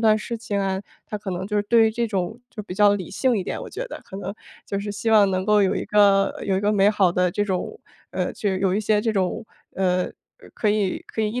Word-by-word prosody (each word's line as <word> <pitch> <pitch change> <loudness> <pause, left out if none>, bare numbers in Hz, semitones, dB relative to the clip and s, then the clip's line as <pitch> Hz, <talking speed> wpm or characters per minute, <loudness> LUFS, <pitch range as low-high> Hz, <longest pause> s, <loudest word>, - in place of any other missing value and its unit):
断 220 -1 +5
事 230 +2 -4
情 205 -3 -3
啊， 190 0 -1 0.3
他 210 - -4
可 200 -2 -6
能 185 +1 -3
就 210 0 -2
是 205 - +2
对 225 +1 +4
于 - - +2
这 235 +1 -1
种 200 +1 -2
就 210 - -7
比 180 -3 -7
较 205 0 +5
理 185 -5 -5
性 245 +4 +1
一 190 - -1
点， - - -4
我 - - -8
觉 - - -5
得。 - - -8
可 190 - -9
能 200 +1 -5 0.3
就 200 - -2
是 205 +1 -4
希 225 +3 -2
望 205 -3 +6
能 185 0 -1
够 210 -1 +4
有 190 - +2
一 - - -2
个， 200 -1 +4
有 190 -1 +1
一 - - 0
个 210 +1 +2
美 200 0 +4
好 195 -4 +3
的 180 -1 +2
这 205 +3 0
种， 200 - -3 0.3
呃， - - -2
就 200 -4 -1
有 190 0 +1
一 210 - +1
些 210 0 +2
这 220 +1 0
种， 195 +3 -1 0.3
呃， 180 -1 +1
呃， - - -6 0.4
可 215 - 0
以， 205 -3 +1
可 220 - -3
以 210 - 0
一 245 +3 -3
205 Hz, 295 characters per minute, -23 LUFS, 190-215 Hz, 0.4 s, 望